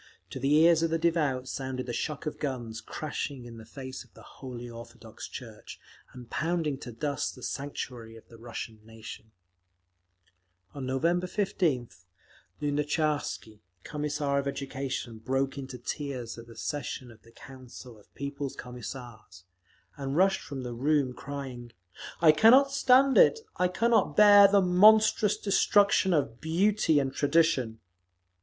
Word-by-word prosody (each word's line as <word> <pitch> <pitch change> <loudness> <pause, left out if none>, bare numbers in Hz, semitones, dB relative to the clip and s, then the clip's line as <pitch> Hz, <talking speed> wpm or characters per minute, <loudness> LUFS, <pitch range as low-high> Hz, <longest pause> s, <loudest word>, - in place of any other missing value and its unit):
To - - -6
the 135 +3 +2
ears 165 +1 +5
of 165 - +1
the 165 - +1
devout 155 -6 0
sounded 130 -1 -4
the 120 - -5
shock 150 +6 -4
of 150 - -5
guns 120 -6 -4
crashing 145 -4 -5
in 115 -1 -10
the 110 - -12
face 130 +1 -8
of 120 - -25
the - - -14
Holy 125 -2 -9
Orthodox 115 0 -10
Church, - - -10 0.3
and 125 -2 -11
pounding 155 -1 -1
to 120 - -8
dust 140 +5 -3
the 125 - -13
sanctuary 125 -5 -6
of 115 - -15
the 115 - -15
Russian 115 -1 -7
nation…. 110 0 -11 1.4
On 135 -2 -6
November 170 +7 0
15th, 165 - -2 0.5
Lunatcharsky, 145 -6 -2 0.2
Commissar 145 -1 -2
of 140 - -3
Education, 135 -4 -4
broke 135 +4 -1
into 130 -1 -7
tears 125 -1 -5
at 115 - -12
the 115 -1 -14
session 130 0 -5
of 115 - -18
the 115 - -20
Council 125 -2 -12
of 105 - -24
People's 140 -1 -5
Commissars, 120 -6 -9 0.5
and 140 +1 -3
rushed 190 +1 +3
from 135 -2 -7
the 120 -1 -5
room, 135 +1 +1
crying, 130 -4 -8 0.5
"I 160 -2 +8
cannot 250 - +6
stand 270 0 +4
it! 455 - +5 0.2
I 180 - +3
cannot 230 +5 +1
bear 205 -1 +9
the 200 0 +4
monstrous 210 +3 +5
destruction 200 -1 +3
of 140 -8 0
beauty 175 0 +2
and 135 -2 0
tradition…." 140 -7 +1
140 Hz, 145 wpm, -28 LUFS, 120-165 Hz, 1.4 s, bear